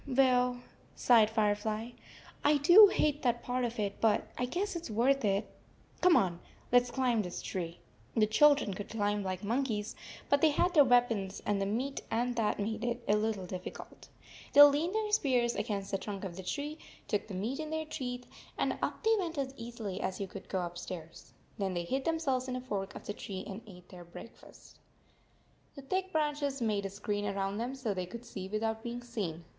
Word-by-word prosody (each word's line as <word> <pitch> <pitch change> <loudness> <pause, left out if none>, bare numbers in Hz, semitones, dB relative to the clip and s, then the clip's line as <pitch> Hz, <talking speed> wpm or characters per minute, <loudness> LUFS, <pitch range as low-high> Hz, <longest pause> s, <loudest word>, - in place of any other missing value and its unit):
"Well," 250 -2 +3 0.3
sighed 225 -3 +5
Firefly, 215 +1 0 0.5
"I 295 +1 +5
do 350 +9 +9
hate 300 -6 +1
that 240 -2 0
part 250 0 -1
of 235 0 -2
it, 200 -1 -2
but 220 -2 +2
I 250 - -1
guess 365 +10 -2
it 340 - -3
s - - -6
worth 250 +5 +2
it. 200 0 +1 0.5
Come 360 -2 +6
on. 175 -3 +1 0.3
Let 245 0 +7
s 245 - -8
climb 245 -3 +1
this 180 -3 -5
tree." 175 -2 -4 0.4
The 215 - +5
children 280 0 +4
could 200 +2 -7
climb 205 -1 0
like 185 -1 -4
monkeys, 225 -2 -1 0.3
but 285 0 +3
they 320 - +6
had 350 +4 +1
their 300 -4 +8
weapons 240 -6 +2
and 205 -1 0
the 195 - 0
meat 255 +7 -2
47 225 - -1
and 245 0 -1
that 220 -2 +1
made 220 +2 -2
it 240 0 -2
a 205 - +4
little 210 -3 -1
difficult. 180 0 -8 0.4
They 290 - +11
leaned 295 +7 +4
their 430 -1 0
spears 250 - +2
against 200 -2 -3
the 195 - 0
trunk 200 -1 -6
of 185 -3 -5
the 190 - -6
tree, 295 - -4 0.3
took 205 - -1
the 200 - -6
meat 225 +9 -2
in 310 -1 -4
their 315 0 -2
teeth, 250 -5 -5 0.3
and - - 0
up - - -3
they 445 +1 +4
went 340 -4 -3
as 270 -1 -2
easily 230 -5 -6
as 185 - -3
you 200 - -2
could 195 +1 -10
go 185 -2 -1
upstairs. 175 -1 -8 0.3
Then 190 -2 -1
they 175 - -1
hid 265 +10 -2
themselves 280 -6 0
in 255 - -3
a 255 - -3
fork 200 -6 -4
of - - -9
the 205 - -3
tree 190 -2 -6
and 200 +3 -7
ate 180 -3 -14
their 180 -2 -10
breakfast. 175 +7 -14 1.0
The 275 - -9
thick 375 +6 -2
branches 295 -3 0
made 210 -4 0
a - - -8
screen 205 +1 -3
around 195 0 -2
them 245 +3 -3
so 250 -6 -2
they 185 -2 -3
could 235 +6 -9
see 190 -5 -6
without 220 +2 -2
being 240 +1 -5
seen. 190 -9 -4
230 Hz, 205 wpm, -32 LUFS, 200-270 Hz, 1.0 s, They